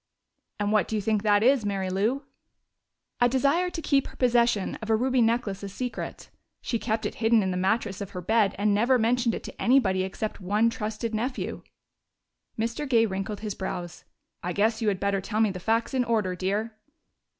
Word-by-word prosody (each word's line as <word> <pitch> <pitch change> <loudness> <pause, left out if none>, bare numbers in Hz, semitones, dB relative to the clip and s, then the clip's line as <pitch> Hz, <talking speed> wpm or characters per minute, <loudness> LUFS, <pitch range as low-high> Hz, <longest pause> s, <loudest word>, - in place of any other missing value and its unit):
"And 205 0 0
what 210 -5 +3
do 220 - -3
you 210 - 0
think 215 0 +1
that 205 0 +3
is, 260 -1 +4
Mary 195 -2 -2
Lou?" 220 +9 0 1.0
"A 245 - +4
desire 280 +8 +2
to 345 -2 -5
keep 275 -2 +2
her - - -13
possession 240 -4 +2
of 220 - -6
a 220 - +4
ruby 255 +2 +2
necklace 225 -4 0
a 200 - -5
secret. 245 +5 -6 0.3
She 230 - -2
kept 220 -1 -2
it - - -2
hidden 225 -1 +4
in 190 - -1
the - - -2
mattress 195 +2 0
of 200 - -5
her 180 - -6
bed 210 +1 +2
and 205 +1 +2
never 235 +5 +3
mentioned 235 0 +1
it - - -7
to - - -9
anybody 230 -8 +3
except 195 +3 -4
one 210 +5 +2
trusted 220 -1 -4
nephew." 245 +4 -3 1.0
Mr. 230 +6 -2
Gay 230 -3 +4
wrinkled 195 0 -4
his 210 -2 -3
brows. 175 -3 -5 0.4
"I 180 +1 -3
guess 220 +4 +1
you 220 - 0
had 195 -3 +1
better 200 -1 0
tell 215 +3 -3
me 220 -2 +3
the 185 - -6
facts 225 +7 0
in 255 -1 +2
order, 215 -6 0
dear." 205 +5 -2
220 Hz, 200 wpm, -26 LUFS, 200-235 Hz, 1.0 s, is